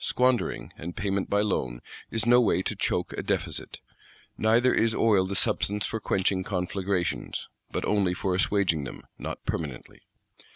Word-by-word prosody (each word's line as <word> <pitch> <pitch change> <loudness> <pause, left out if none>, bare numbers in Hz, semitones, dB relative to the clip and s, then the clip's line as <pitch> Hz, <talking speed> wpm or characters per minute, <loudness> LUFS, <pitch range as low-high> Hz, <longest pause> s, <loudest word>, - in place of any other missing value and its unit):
Squandering, 125 -1 +1
and 85 +2 -6
Payment 100 +1 -1
by 100 0 +3
Loan 65 -12 -1 0.3
is 110 -1 -1
no 120 +1 +6
way 100 -5 +2
to - - -2
choke - - -1
a - - -3
Deficit. - - -3 0.5
Neither 115 +3 +4
is 115 0 +2
oil 100 -5 +4
the 100 - -3
substance 100 +1 +1
for 110 - -3
quenching 95 -2 +1
conflagrations;—but, 95 -1 -3
only 100 -4 +2
for 95 +1 -1
assuaging 90 -4 +2
them, - - -8 0.2
not - - -6
permanently! 75 -7 -4
100 Hz, 150 wpm, -27 LUFS, 90-110 Hz, 0.5 s, no